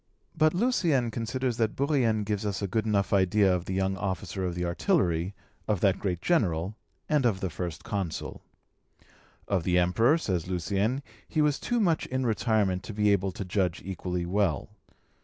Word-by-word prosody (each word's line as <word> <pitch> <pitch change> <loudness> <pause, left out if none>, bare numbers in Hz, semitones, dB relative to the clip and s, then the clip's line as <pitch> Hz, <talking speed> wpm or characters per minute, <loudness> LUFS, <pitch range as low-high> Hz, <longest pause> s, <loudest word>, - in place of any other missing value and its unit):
But 155 0 +3
Lucien 170 - +2
considers 120 +2 -2
that 110 -2 0
Bourrienne 130 -7 +1
gives 105 0 -2
us 100 -1 -2
a - - 0
good 110 +4 -1
enough 100 -2 +1
idea 95 0 +4
of 90 -1 -4
the 95 - -3
young 95 0 0
officer 95 0 -3
of 90 -2 -2
the 90 0 -2
artillery, 90 - +1 0.3
of 105 -4 +1
the 100 -2 +5
great 90 -3 -3
General, 95 - +1 0.3
and 150 -3 +2
of 110 -6 +2
the 95 -3 -3
First 85 -1 -5
Consul. 100 -7 -4 1.1
Of 95 -4 0
the 90 0 +2
Emperor, 115 - +4
says 90 - -2
Lucien, 100 - -1 0.2
he 155 - -2
was 150 -1 +2
too 240 -1 0
much 175 -7 +1
in 130 0 -1
retirement 110 -5 +1
to 110 - -7
be 105 -1 +3
able 100 -1 +1
to 95 - -6
judge 90 -2 -1
equally 90 -2 -3
well. 90 -5 0
100 Hz, 175 wpm, -28 LUFS, 90-120 Hz, 1.1 s, the